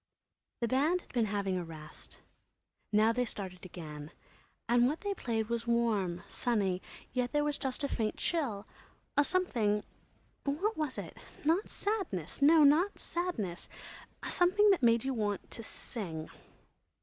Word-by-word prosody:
The 235 - +2
band 300 +9 +2
had - - -20
been 235 -3 +3
having 195 -2 -1
a - - -3
rest. 155 -2 -10 0.7
Now 215 +2 +4
they 250 +1 +1
started 190 -6 -5
again. 150 -4 -8 0.6
And 240 +1 +5
what 300 +5 -2
they 405 -1 -1
played 225 - -2
was 235 0 -2
warm, 210 -7 +1
sunny, 195 -6 0 0.3
yet 250 0 -1
there 295 0 +3
was 295 -1 0
just 265 0 -1
a - - +2
faint 220 -5 -1
chill—a 280 - -2
something, 235 - +1 0.6
what 355 +11 0
was 305 -4 -2
it?—not 330 +7 -2
sadness—no, 315 - +2
not 320 +8 +5
sadness—a 230 - -5
something 395 +4 +5
that 380 - +3
made 230 -2 +4
you 270 0 -1
want 205 -4 -2
to - - -5
sing. 175 -8 -4
235 Hz, 135 wpm, -32 LUFS, 205-300 Hz, 0.7 s, And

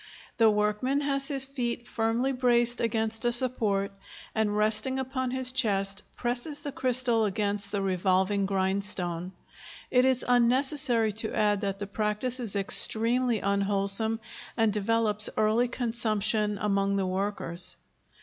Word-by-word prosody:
The 225 -1 +4
workman 210 +7 -1
has 275 -1 +2
his 275 -2 +4
feet 240 -3 -4
firmly 230 +4 -1
braced 240 -2 +1
against 225 0 0
a 240 - +3
support, 220 -5 0 0.4
and, 210 -2 -1
resting 220 +5 +1
upon 260 -1 -3
his 255 0 +2
chest, 200 -5 +1 0.2
presses 245 +5 -3
the 290 -1 -6
crystal 245 -4 0
against 200 0 0
the 200 -2 -2
revolving 190 +1 0
grindstone. 190 -2 -2 0.6
It 250 0 +3
is 260 -1 +1
unnecessary 245 -1 +1
to 220 - -4
add 210 -1 +1
that 195 -1 -3
the 205 - -6
practice 210 +5 -3
is 225 -5 -4
extremely 230 +4 +4
unwholesome 200 +2 +1 0.4
and 225 -2 +1
develops 210 0 +2
early 220 +3 +1
consumption 215 -3 -1
among 200 -1 -1
the 195 -1 -1
workers. 185 -2 -1
220 Hz, 130 wpm, -27 LUFS, 200-245 Hz, 0.6 s, The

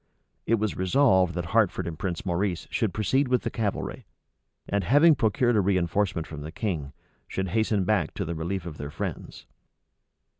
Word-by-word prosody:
It 115 - +4
was 110 -2 -1
resolved 95 - +3
that 85 -1 -4
Hertford 110 -5 +2
and 80 -2 -6
Prince 90 -2 -3
Maurice 90 0 -1
should 110 -4 0
proceed 130 +8 +1
with 125 0 +1
the - - -2
cavalry; 105 -3 -3 0.6
and, 100 -1 0
having 145 - +6
procured 120 -1 +2
a - - +4
reënforcement 90 -2 +1
from 75 -2 -8
the 75 +2 -7
king, 85 -7 -3 0.4
should 95 -1 -3
hasten 110 0 +1
back 90 -5 0
to 100 - -2
the 85 - -3
relief 85 +3 -3
of 80 -3 -7
their 70 - -5
friends. - - -6
95 Hz, 175 wpm, -26 LUFS, 85-110 Hz, 0.6 s, having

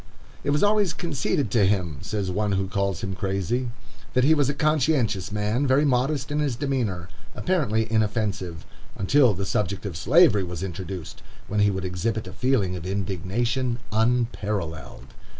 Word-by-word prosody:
"It 145 - -1
was 145 +1 +2
always 205 -4 +3
conceded 145 -4 -1
to 115 -4 +3
him," 90 -7 +1
says 100 -3 -2
one 105 +2 0
who 95 0 0
calls 100 -2 -1
him 95 0 -2
crazy, 100 +6 -1 0.4
"that 125 - +3
he 150 +4 +6
was 145 -3 +2
a 140 - -1
conscientious 145 - +1
man, 105 +6 0
very 135 +3 +4
modest 135 +2 +1
in 150 - 0
his 145 -5 0
demeanor, 115 - -2 0.3
apparently 125 - +1
inoffensive, 105 -6 -1 0.3
until 120 +2 +4
the 100 +2 -3
subject 100 0 -1
of 95 -5 -4
Slavery 110 - +5
was 90 0 -5
introduced, 95 -1 -6 0.3
when 105 - -1
he 105 0 +5
would 95 -2 -2
exhibit 100 +5 -2
a - - -8
feeling 120 -8 +1
of 90 0 -6
indignation 105 +6 -1
unparalleled." 105 - -1
105 Hz, 160 wpm, -25 LUFS, 95-130 Hz, 0.4 s, he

